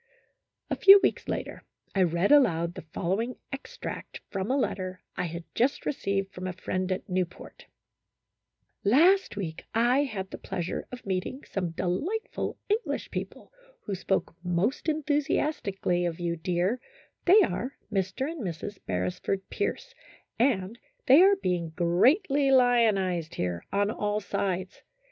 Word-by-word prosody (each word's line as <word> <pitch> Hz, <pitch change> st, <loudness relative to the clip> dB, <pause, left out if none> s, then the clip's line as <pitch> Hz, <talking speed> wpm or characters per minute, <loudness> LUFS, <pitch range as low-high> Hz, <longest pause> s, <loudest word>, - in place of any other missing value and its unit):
A -, -, +2 dB
few 395 Hz, +1 st, +9 dB
weeks -, -, +1 dB
later, -, -, -4 dB, 0.3 s
I 195 Hz, -, +2 dB
read 175 Hz, -, +2 dB
aloud 170 Hz, -, +4 dB
the 185 Hz, -, -7 dB
following 195 Hz, +9 st, -2 dB, 0.2 s
ex 270 Hz, -, -8 dB
tract -, -, -6 dB
from 195 Hz, +1 st, -2 dB
a 265 Hz, -, +2 dB
letter 185 Hz, -8 st, -2 dB
I -, -, -1 dB
had 170 Hz, 0 st, -5 dB
just 255 Hz, +4 st, +1 dB
received 195 Hz, -7 st, -1 dB
from 185 Hz, +1 st, -5 dB
a 185 Hz, -, -3 dB
friend 185 Hz, +1 st, -3 dB
at 185 Hz, -, -3 dB
Newport: 180 Hz, -2 st, -4 dB, 0.6 s
" -, -, -52 dB
Last 335 Hz, -, +4 dB
week 165 Hz, -6 st, -4 dB
I 240 Hz, +4 st, +4 dB
had 195 Hz, -7 st, -5 dB
the -, -, -7 dB
pleasure 175 Hz, -1 st, -4 dB
of 250 Hz, 0 st, -9 dB
meeting 195 Hz, +8 st, -3 dB
some 180 Hz, -3 st, -3 dB
delightful 240 Hz, -, -2 dB
English 430 Hz, +3 st, -1 dB
people, -, -, -6 dB, 0.3 s
who 205 Hz, -, -5 dB
spoke 190 Hz, -2 st, -1 dB
most 185 Hz, -, 0 dB
enthusiastically 285 Hz, -, 0 dB
of 165 Hz, 0 st, -4 dB
you, 170 Hz, -1 st, -1 dB
dear; 180 Hz, +7 st, 0 dB, 0.5 s
they 390 Hz, +4 st, +7 dB
are 270 Hz, -5 st, -2 dB, 0.2 s
Mr. 190 Hz, +7 st, -1 dB
and 325 Hz, -2 st, -5 dB
Mrs. 190 Hz, +1 st, -5 dB
Beresford 90 Hz, -, -2 dB
Pierce, 485 Hz, +4 st, -3 dB, 0.5 s
and 230 Hz, -3 st, +1 dB, 0.3 s
they 275 Hz, +6 st, +8 dB
are 395 Hz, +2 st, +7 dB
being 175 Hz, -, -2 dB
greatly 270 Hz, -, +3 dB
lionized 215 Hz, -10 st, +3 dB
here, 90 Hz, -1 st, -3 dB
on 200 Hz, +1 st, +1 dB
all 210 Hz, -1 st, -1 dB
sides. 195 Hz, -2 st, -3 dB
195 Hz, 145 wpm, -28 LUFS, 180-265 Hz, 0.6 s, few